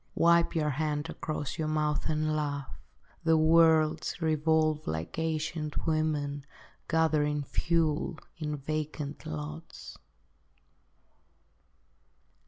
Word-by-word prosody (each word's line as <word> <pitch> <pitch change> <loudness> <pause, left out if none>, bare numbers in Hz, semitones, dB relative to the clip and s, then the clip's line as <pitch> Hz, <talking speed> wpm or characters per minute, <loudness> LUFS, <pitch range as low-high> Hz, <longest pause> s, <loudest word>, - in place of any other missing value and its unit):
Wipe 170 0 +4
your 150 -2 +1
hand 150 +2 -2
across 155 -2 -4
your 155 - 0
mouth, 150 -1 0
and 155 0 0
laugh; 145 -2 -3 0.5
The 165 -1 +4
worlds 160 0 +4
revolve 155 -1 +1
like 80 - -3
ancient 155 -1 -2
women 150 -3 0 0.4
Gathering 150 -3 +2
fuel 165 +1 0 0.2
in 150 -2 -3
vacant 150 0 -4
lots. 75 0 -7
155 Hz, 90 wpm, -30 LUFS, 150-160 Hz, 0.5 s, Wipe